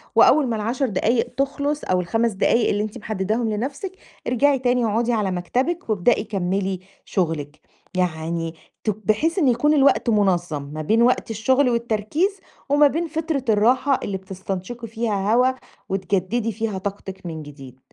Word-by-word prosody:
وأول 295 -4 +6
ما 230 - -1
ال10 235 +5 -1
دقايق 225 +4 +1
تخلص 285 +2 -1
أو 185 0 +1
ال5 225 +6 0
دقايق 215 +4 +2
اللي 205 0 +1
أنتِ 215 +3 -5
محدداهم 215 +2 -1
لنفسِك 270 - -3 0.4
ارجعي 270 +3 +3
تاني 245 -1 +2
اقعدي 230 +3 +1
على 210 -4 0
مكتبِك 250 - -1
وابدئي 215 +1 +2
كمّلي 195 -2 -1 0.3
شغلِك. 155 -5 -2 0.4
يعني 165 -1 -1 0.3
ت - - 0
بحيث 215 - 0
إن 295 - +3
يكون 255 +5 +3
الوقت 275 -3 +4
منظّم 175 -8 +1
ما 150 +2 -6
بين 220 +9 +2
وقت 240 -1 +2
الشغل 255 +5 +2
والتركيز 235 - 0 0.3
وما 290 +1 +6
بين 330 +4 -1
فترة 320 -3 -2
الراحة 250 +6 +3
اللي 195 - -2
بتستنشقي 190 +4 -6
فيها 215 -2 -1
هوا 250 +2 +4 0.4
وتجددي 195 +4 0
فيها 220 -2 -3
طاقتِك 190 -1 -6
من 160 -2 -5
جديد. 135 -3 -12
220 Hz, 150 wpm, -22 LUFS, 190-255 Hz, 0.4 s, وأول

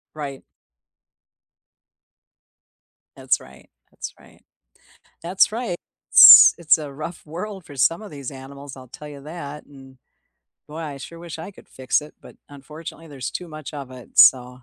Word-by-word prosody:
Right. 140 -3 -7 2.7
That's - - -1
right, - - -18 0.2
that's - - -9
right. - - -22 0.8
That's 185 +4 +1
right, 225 -6 -4 0.4
s - - +10
it's 165 -1 +3
a 145 -2 -8
rough 155 +3 -9
world 185 +3 -8
for 145 - -13
some 165 - +1
of 210 - -11
these 140 -3 -8
animals, 140 +1 -11
I'll 130 -2 -13
tell 150 +4 -11
you 140 -1 -11
that, 150 -2 -9
and 135 -2 -17 0.7
boy, 150 +2 -10
I 145 -4 -7
sure 165 +4 -11
wish 170 -2 -9
I 180 +5 -8
could - - -19
fix 130 +3 -1
it, 150 - -14
but - - -16
unfortunately 155 +4 -11
there's 135 -3 -7
too 180 - -7
much 155 -1 -10
of 140 -3 -8
it, 125 -2 -14
so 125 -1 +6
150 Hz, 155 wpm, -21 LUFS, 135-165 Hz, 2.7 s, s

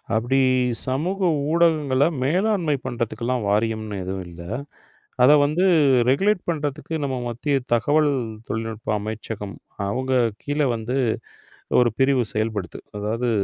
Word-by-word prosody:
அப்டி 120 +4 +2 0.5
சமூக 180 +9 0 0.2
ஊடகங்கள 155 -5 +3 0.2
மேலாண்மை 175 +1 +1
பண்ணறதுக்கெல்லாம் 120 -1 -2
வாரியம்ன்னு 110 0 0
எதுவும் 95 +1 -4
இல்ல. 85 0 -11 0.8
அத 125 - +7
வந்து 155 +6 +1 0.5
ரெகுலேட் 195 +8 +2
பண்றதுக்கு 150 -1 -4
நம்ம 135 -2 -2
மத்திய 140 +5 -1 0.2
தகவல் 145 +6 +3 0.4
தொழில்நுட்ப 110 -1 -3
அமைச்சகம். 105 -1 -6 0.3
அவங்க 130 +5 -2 0.3
கீழ 145 +1 -2
வந்து 115 +4 -2 0.8
ஒரு 120 -1 +4
பிரிவு 135 -1 +3
செயல்படுது. 110 -4 -2 0.2
அதாவது 115 +4 -1
125 Hz, 105 wpm, -23 LUFS, 110-150 Hz, 0.8 s, அத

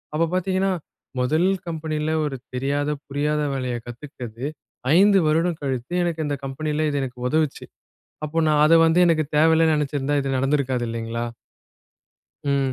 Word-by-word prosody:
அப்பப் 165 +2 0
பார்த்தீங்கன்னா, 190 +1 +1 0.5
முதல் 155 +8 +2 0.2
கம்பெனில 155 -1 -2
ஒரு 140 -2 -3 0.2
தெரியாத, 145 +3 -1 0.2
புரியாத 150 +2 0
வேலையை 130 -2 -2
கத்துக்கிட்டது. 120 -1 -8 0.5
5 200 +1 +6
வருடம் 165 +2 +1
கழித்து, 130 +3 -3
எனக்கு 170 -2 -2
இந்த 145 - -1
கம்பெனில 150 +3 -1
இது 145 -1 -1
எனக்கு 125 -2 -7
உதவுச்சு. 155 -1 0 0.6
அப்போ 155 +2 -1
நான் 150 -1 +3
அதை 165 +2 +6
வந்து 165 +2 +3
எனக்குத் 155 -3 +1
தேவையில்லைன்னு 160 0 +4
நினைச்சு 145 -1 -1
இருந்தா, 145 +2 0
இது 135 -1 -1
நடந்து 135 +3 +2
இருக்காது 125 -3 -1
இல்லீங்களா? 115 +1 -3 1.3
ம். 135 -1 +1
150 Hz, 145 wpm, -23 LUFS, 135-160 Hz, 1.3 s, 5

